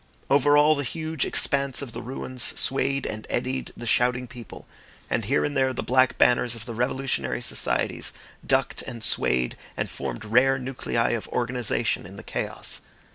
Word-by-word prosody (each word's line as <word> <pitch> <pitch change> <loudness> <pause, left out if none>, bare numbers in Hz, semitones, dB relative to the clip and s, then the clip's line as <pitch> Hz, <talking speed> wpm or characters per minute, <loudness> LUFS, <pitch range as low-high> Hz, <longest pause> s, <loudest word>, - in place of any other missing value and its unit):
Over 145 +1 +5
all 150 +1 +6
the 145 -1 -2
huge 160 +2 -2
expanse 140 -1 +1
of 130 - -7
the - - -6
ruins 125 0 -1
swayed 135 +1 +1
and 110 0 -5
eddied 130 +2 -2
the 120 - -7
shouting 125 +2 +2
people; 120 -1 -11 0.5
and 110 - 0
here 135 +7 +2
and 145 - -3
there 130 -1 +2
the - - -3
black 130 0 +3
banners 120 -1 +4
of 115 -1 -8
the 120 - -6
revolutionary 125 - -1
societies - - 0 0.3
ducked - - +1
and 115 -3 -7
swayed 60 - +1 0.2
and - - -2
formed - - -5
rare 125 +5 +4
nuclei 125 -2 -1
of 115 -2 -2
organisation 120 -2 0
in - - -11
the - - -9
chaos. - - -3
125 Hz, 170 wpm, -25 LUFS, 120-135 Hz, 0.5 s, all